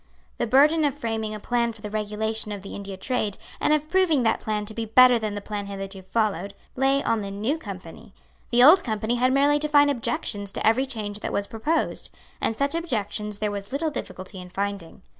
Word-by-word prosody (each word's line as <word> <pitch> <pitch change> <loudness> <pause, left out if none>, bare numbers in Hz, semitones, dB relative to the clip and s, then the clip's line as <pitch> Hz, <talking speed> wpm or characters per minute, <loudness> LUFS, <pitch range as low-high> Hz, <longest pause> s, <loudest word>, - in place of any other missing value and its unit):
The 240 - 0
burden 295 +6 +5
of 285 -2 +1
framing 220 -4 -3
a - - -6
plan 235 +1 0
for 220 -1 -16
the 210 - -4
regulation 215 +1 -2
of 200 -2 -6
the 195 - -8
India 200 -1 -7
trade, 215 -2 -2 0.2
and - - +2
of 305 0 +2
proving 330 -6 +3
that 225 - +2
plan 210 -1 -2
to 215 - -5
be 230 - -3
better 250 +2 +6
than 215 -2 -3
the 205 - -4
plan 205 -1 -5
hitherto 195 -1 -6
followed, 200 0 -1 0.2
lay 270 +1 +2
on 225 -1 +1
the 200 - -5
New 215 +11 -2
Company. 195 - -9 0.4
The 245 +1 +5
Old 330 +7 +8
Company 220 +1 -1
had 255 +1 +3
merely 285 +2 +4
to 300 - -1
find 290 -1 +5
objections 225 -6 -2
to - - -3
every 255 +5 +3
change 210 -5 -4
that - - -4
was 200 - -1
proposed; 260 +11 -1 0.3
and 225 - 0
such 280 +1 0
objections 210 -10 -2
there 210 0 -1
was 200 -1 -6
little 305 +3 -1
difficulty 185 -8 -6
in 180 - -10
finding. 195 -1 -4
220 Hz, 215 wpm, -25 LUFS, 205-270 Hz, 0.4 s, Old